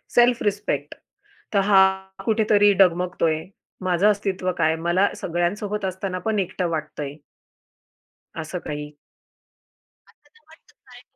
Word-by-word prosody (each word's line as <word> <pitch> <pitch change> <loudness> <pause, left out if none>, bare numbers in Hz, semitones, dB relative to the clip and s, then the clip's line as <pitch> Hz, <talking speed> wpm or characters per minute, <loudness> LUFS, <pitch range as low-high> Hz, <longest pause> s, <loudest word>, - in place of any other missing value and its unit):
Self 240 0 +5
respect, 205 0 -2 0.6
तर 200 - +4
हा 195 -1 +5 0.4
कुठेतरी 210 -2 +4
डगमगतोय? 170 -3 0 0.4
माझं 185 +2 +2
अस्तित्व 195 -3 -1
काय? 160 -1 +2
मला 175 +4 +2
सगळ्यांसोबत 195 +4 -2
असताना 190 0 -3
पण 215 -2 +1
एकटं 185 -1 -2
वाटतं 155 -2 -4
आहे 140 +1 -6 1.2
असं 165 +3 -5
काही? 150 0 -5 1.2
असं 295 - -28
तर 305 - -24
वाटतय 320 - -21
काय? - - -15
185 Hz, 120 wpm, -23 LUFS, 170-205 Hz, 1.2 s, Self